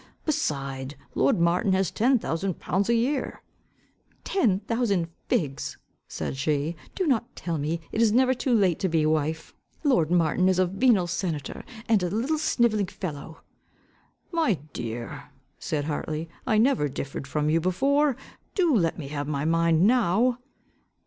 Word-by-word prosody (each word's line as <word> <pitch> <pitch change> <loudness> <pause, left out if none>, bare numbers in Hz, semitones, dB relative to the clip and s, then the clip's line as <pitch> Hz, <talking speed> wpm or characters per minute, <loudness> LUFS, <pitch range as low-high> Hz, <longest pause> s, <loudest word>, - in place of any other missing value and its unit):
Beside, 140 - -2 0.2
lord 245 -9 +2
Martin 175 +3 +2
has 190 -1 +1
ten 255 +4 +3
thousand 185 -3 -3
pounds 195 +4 -1
a 235 - +4
year." 255 +3 -1 0.8
"Ten 225 - +2
thousand 205 -6 0 0.2
figs," 140 -5 -1 0.3
said - - -4
she, 150 +3 0 0.2
"do 375 - 0
not 240 -6 0
tell 165 -3 -3
me, 155 +4 -1
it 225 - 0
is 225 -2 +4
never 255 +3 +4
too 260 +1 -2
late 195 -8 +3
to 190 - 0
be 160 -2 +2
wife. 155 +1 -1 0.3
Lord 180 - +3
Martin 175 +1 +3
is 185 - +2
a 185 - +4
venal 195 +1 +3
senator, 165 -5 -3 0.2
and 220 -4 +3
a 180 - 0
little 255 - 0
sniveling 230 -9 +2
fellow." 160 -4 -7 0.9
"My 325 - +2 0.2
dear," 120 0 -5 0.3
said 145 -2 -2
Hartley, 155 +1 -3 0.2
"I 220 -4 +3
never 225 - +3
differed 135 0 -5
from 150 +1 0
you 165 +1 +2
before: 275 - +2 0.4
do 345 -8 +3
let 170 -6 +1
me 145 -5 -6
have 145 -1 -4
my 145 -1 -2
mind 165 0 +3
now." 240 +1 +3
180 Hz, 155 wpm, -26 LUFS, 155-235 Hz, 0.9 s, a